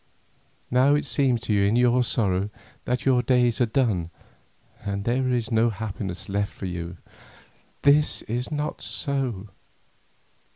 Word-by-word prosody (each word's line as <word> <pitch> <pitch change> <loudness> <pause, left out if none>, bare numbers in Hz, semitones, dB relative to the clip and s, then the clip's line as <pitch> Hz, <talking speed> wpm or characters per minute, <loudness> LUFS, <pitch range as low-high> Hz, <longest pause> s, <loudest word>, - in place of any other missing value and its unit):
Now 130 +4 +4
it 145 - -1
seems 130 -5 +1
to 115 - -1
you 100 - +3
in 100 +3 +2
your 125 +1 +4
sorrow, 100 -4 +1 0.4
that 125 +1 -1
your 130 -2 +4
days 125 0 +2
are 120 - +4
done 110 -9 0 0.7
and 100 0 -3
that 120 - +1
there 130 0 0
is 120 -2 -1
no 115 +1 +3
happiness 95 -4 -5
left 100 +1 -1
for - - -8
you. 85 -1 -5 0.9
This 145 +1 +4
is 120 +5 -3
not 150 0 -3
so. 130 -8 -2
120 Hz, 150 wpm, -25 LUFS, 100-130 Hz, 0.9 s, Now